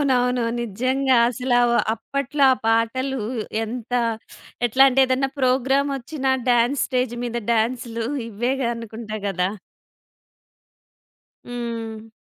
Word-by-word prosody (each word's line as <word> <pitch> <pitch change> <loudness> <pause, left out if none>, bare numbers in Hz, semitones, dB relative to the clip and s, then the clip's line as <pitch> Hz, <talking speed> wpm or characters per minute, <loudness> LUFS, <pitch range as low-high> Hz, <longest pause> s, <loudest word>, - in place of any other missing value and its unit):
అవునవును. 250 -3 +2 0.2
నిజంగా 255 +4 +1
అసలు 250 +1 -1
అవ్ 240 0 +3 0.2
అప్పట్లో 275 +3 -1
ఆ - - +3
పాటలు 230 +3 +1 0.4
ఎంత 240 +1 -7 0.7
ఎట్లంటే 265 +2 +5
ఏదన్నా 260 +1 +1
ప్రోగ్రామొచ్చినా 270 +2 +1 0.2
డాన్స్ 245 +3 +3
స్టేజ్ 250 -2 -1
మీద 240 0 -3 0.2
డాన్సులు 230 0 -1 0.2
ఇవేగా 240 +4 -1
అనుకుంటా 225 -1 -7
గదా! 190 -1 0 1.9
హ్మ్. 230 -2 -6
245 Hz, 95 wpm, -22 LUFS, 230-265 Hz, 1.9 s, ఎట్లంటే